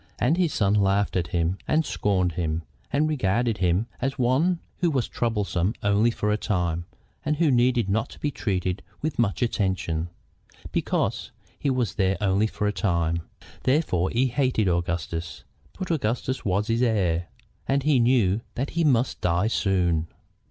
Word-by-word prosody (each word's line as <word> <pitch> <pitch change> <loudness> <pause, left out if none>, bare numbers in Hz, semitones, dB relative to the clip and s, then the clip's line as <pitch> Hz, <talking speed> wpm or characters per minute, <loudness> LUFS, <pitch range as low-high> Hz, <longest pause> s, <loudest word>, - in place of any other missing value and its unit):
And 135 +7 +2
his 175 -3 +1
son 100 -6 +2
laughed 100 0 +2
at 90 -3 0
him 85 +2 -1
and 155 +1 +2
scorned 95 -7 +1
him, 80 -1 -2 0.3
and 145 +2 +2
regarded 115 - 0
him 90 +4 +2 0.2
as 135 +2 -1
one 135 +8 +2 0.2
who 175 - +2
was 135 -6 0
troublesome 105 -3 -1
only 100 +3 +3
for 105 -2 -1
a 105 - +2
time, 85 -5 -1 0.4
and 150 +1 0
who 160 -2 +3
need 120 -3 +3
not 110 +3 -1
be 145 - -1
treated 95 -6 -2 0.2
with 155 -4 -2
much 115 +1 +1
attention, 90 -7 -1 0.6
because - - -1 0.3
he 145 - 0
was 125 -5 0
there 95 -1 +2
only 100 +1 +2
for 105 - -3
a 105 - +1
time. 85 -3 0 0.4
Therefore 130 - +1
he 125 +3 +2
hated 125 -4 +1
Augustus. 85 -1 -2 0.3
But 185 -2 -3
Augustus 130 -2 -1
was 100 +1 +1
his 115 +2 0
heir, 90 -8 +1 0.4
and 135 0 +1
he 145 -3 +3
knew 115 -4 +3
that 135 +4 -2
he 170 - 0
must 130 -5 +2
die 90 +4 +2
soon. 90 -7 +1
105 Hz, 160 wpm, -25 LUFS, 90-130 Hz, 0.6 s, only